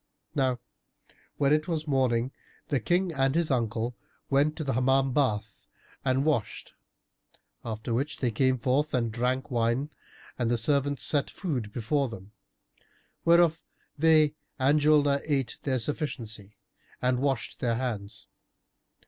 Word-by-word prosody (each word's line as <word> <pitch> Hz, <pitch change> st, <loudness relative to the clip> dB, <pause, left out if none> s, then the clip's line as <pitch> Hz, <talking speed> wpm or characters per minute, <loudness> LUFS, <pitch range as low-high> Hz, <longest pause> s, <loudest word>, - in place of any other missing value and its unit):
Now 130 Hz, -3 st, +1 dB, 0.8 s
when 140 Hz, 0 st, +3 dB
it 155 Hz, +2 st, +1 dB
was 160 Hz, -3 st, -2 dB
morning, 130 Hz, -3 st, +1 dB, 0.4 s
the 140 Hz, -, +1 dB
King 175 Hz, -, +1 dB
and 135 Hz, 0 st, +1 dB
his 170 Hz, -3 st, +1 dB
uncle 115 Hz, -1 st, -1 dB, 0.4 s
went 145 Hz, +3 st, +3 dB
to 155 Hz, -, -4 dB
the 135 Hz, -, -1 dB
Hammam 135 Hz, +2 st, +2 dB
bath 110 Hz, -7 st, -1 dB, 0.4 s
and 130 Hz, +1 st, +1 dB
washed, 145 Hz, -9 st, -1 dB, 0.9 s
after 110 Hz, +1 st, -4 dB
which 135 Hz, +6 st, -1 dB
they 125 Hz, -3 st, 0 dB
came 130 Hz, +3 st, +2 dB
forth 135 Hz, +5 st, +1 dB
and 115 Hz, -2 st, 0 dB
drank 125 Hz, +4 st, -1 dB
wine 120 Hz, +5 st, 0 dB, 0.5 s
and 120 Hz, -2 st, +1 dB
the 120 Hz, -, +2 dB
servants 140 Hz, +3 st, +2 dB
set 145 Hz, -2 st, +1 dB
food 130 Hz, -, -3 dB
before 125 Hz, +5 st, 0 dB
them, 100 Hz, -3 st, -10 dB, 0.9 s
whereof 170 Hz, -1 st, +4 dB, 0.3 s
they 155 Hz, -1 st, +4 dB, 0.2 s
and 140 Hz, +2 st, +3 dB
Julnar 145 Hz, -2 st, +4 dB
ate 140 Hz, -5 st, -1 dB
their 130 Hz, -2 st, 0 dB
sufficiency, 110 Hz, -7 st, -5 dB, 0.4 s
and 125 Hz, 0 st, +1 dB
washed 135 Hz, -2 st, -1 dB
their 120 Hz, -2 st, 0 dB
hands. 110 Hz, -4 st, -4 dB
130 Hz, 135 wpm, -28 LUFS, 120-145 Hz, 0.9 s, whereof